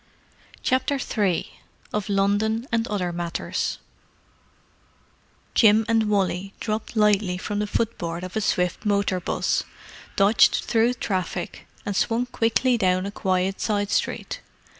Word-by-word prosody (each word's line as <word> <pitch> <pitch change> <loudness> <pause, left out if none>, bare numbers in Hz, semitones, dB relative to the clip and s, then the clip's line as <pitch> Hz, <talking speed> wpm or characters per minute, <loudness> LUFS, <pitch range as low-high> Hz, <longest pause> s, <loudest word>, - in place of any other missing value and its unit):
CHAPTER 260 +2 +1
III 205 -9 -1 0.3
OF 210 -1 -2
LONDON 205 +4 +1
AND 230 0 +1
OTHER 185 -4 -1
MATTERS 170 -1 -2 1.8
Jim 220 -1 +5
and 225 -2 +2
Wally 195 -1 0
dropped 215 +1 -3
lightly 210 -4 +3
from 205 +2 -3
the 210 - -1
footboard 175 -6 -2
of 185 +2 -7
a 220 - +1
swift 180 -3 0
motor 200 -3 +1
'bus, 175 - 0 0.5
dodged 200 +3 +4
through 230 +1 +3
the 245 - -15
traffic, 185 -2 -3 0.2
and 205 - -2
swung 230 +5 +1
quickly 240 +1 +1
down 185 -1 +2
a 200 - -4
quiet 190 -1 -1
side 205 -2 0
street. - - -1
205 Hz, 130 wpm, -24 LUFS, 185-225 Hz, 1.8 s, Jim